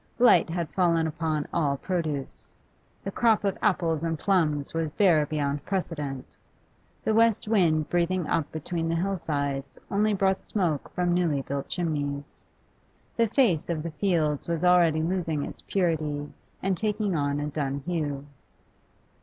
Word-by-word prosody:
Blight 245 -7 +5
had 170 -1 -2
fallen 170 -3 +2
upon 155 -1 -2
all 145 -5 +1
produce; 155 -5 -3 0.5
the 195 - -3
crop 225 0 +3
of 195 -2 +1
apples 165 -6 +1
and 165 -1 -1
plums 150 -6 +1
was 165 -1 -1
bare 165 -7 +4
beyond 145 -2 -1
precedent. 150 -8 -3 0.7
The 220 - +1
west 225 -1 +3
wind 165 -8 +3
breathing 175 +1 +1
up 150 -1 -1
between 165 +1 -3
the 165 - +1
hill 195 +4 0
sides 140 -4 -3
only 210 +1 +2
brought 190 0 +1
smoke 170 -9 -1
from 180 -1 +1
newly 165 -6 +1
built 140 0 -4
chimneys; 145 -4 -3 0.7
the 230 -1 +3
face 205 - +2
of 160 -3 -1
the 170 - -4
fields 155 -4 0
was 170 0 -1
already 170 -3 +4
losing 165 -4 -1
its - - -8
purity 155 -6 -1 0.3
and 190 0 +1
taking 210 0 0
on 145 -1 0
a 145 - -2
dun 140 -2 -3
hue. 145 -5 -2
165 Hz, 150 wpm, -27 LUFS, 150-185 Hz, 0.7 s, Blight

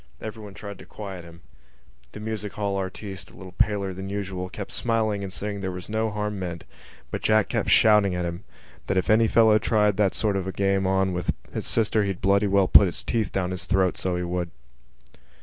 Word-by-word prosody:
Everyone 105 -2 -8
tried 100 -1 -8
to - - -11
quiet 95 -4 -8
him. 85 0 -14 0.7
The - - -8
music 105 -1 -4
hall 100 -1 -2
artiste, 95 +1 -5
a - - -17
little 95 -1 -10
paler 100 0 0
than 95 +1 -6
usual, 95 -2 -4
kept 100 +1 -7
smiling 110 -3 0
and 95 - -5
saying 100 +2 -3
that - - -7
there 95 -1 -2
was 90 +1 -8
no 110 +1 0
harm 105 -1 -3
meant: 85 -3 -5 0.5
but - - -3
Jack 110 -1 +3
kept - - -1
shouting 105 -4 +5
at 90 0 -1
him 85 +4 -5 0.4
that 95 - 0
if 95 +4 +2
any 110 +1 +5
fellow 110 -1 +5
tried 105 -3 +2
that 100 -3 +2
sort 105 -3 0
of 95 -1 -3
a - - -2
game 95 0 +1
on 95 0 +1
with 90 0 -1 0.2
his - - -3
sister 110 -1 +2
he'd 95 -2 -2
bloody 100 +1 +3
well 100 -1 +3
put 100 - +7
his 85 - -4
teeth 110 -5 -1
down 95 -1 -1
his 90 0 -4
throat, 95 -1 +2
so 95 -1 -1
he 90 - -2
would. 90 0 -2
100 Hz, 220 wpm, -25 LUFS, 95-105 Hz, 0.7 s, put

